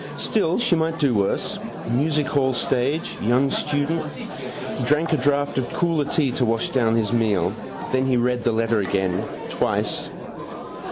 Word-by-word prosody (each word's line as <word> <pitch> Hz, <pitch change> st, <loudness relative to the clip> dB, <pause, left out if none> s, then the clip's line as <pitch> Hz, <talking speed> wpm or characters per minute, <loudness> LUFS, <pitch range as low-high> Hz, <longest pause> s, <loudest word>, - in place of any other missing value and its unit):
Still, 180 Hz, -6 st, +1 dB
she 240 Hz, -7 st, +2 dB
might 165 Hz, 0 st, 0 dB
do 140 Hz, -6 st, +2 dB
worse. 100 Hz, -2 st, 0 dB, 0.3 s
Music 150 Hz, +5 st, +1 dB
hall 130 Hz, -3 st, +1 dB
stage. 130 Hz, +5 st, 0 dB
Young 125 Hz, +5 st, +2 dB
student. 150 Hz, +2 st, 0 dB
He -, -, -7 dB
drank 155 Hz, +3 st, +2 dB
a -, -, +4 dB
draught 145 Hz, +1 st, +1 dB
of 120 Hz, -, -3 dB
cooler 165 Hz, -4 st, +1 dB
tea 140 Hz, -4 st, +1 dB
to 125 Hz, -, 0 dB
wash 115 Hz, -1 st, +1 dB
down 115 Hz, -4 st, +2 dB
his 110 Hz, -2 st, +1 dB
meal. 100 Hz, -6 st, +2 dB, 0.4 s
Then 130 Hz, 0 st, +2 dB
he 130 Hz, -2 st, +3 dB
read 125 Hz, 0 st, +1 dB
the 120 Hz, -, +2 dB
letter 115 Hz, 0 st, +1 dB
again: 95 Hz, -2 st, 0 dB, 0.3 s
twice. -, -, 0 dB
130 Hz, 160 wpm, -23 LUFS, 115-150 Hz, 0.4 s, a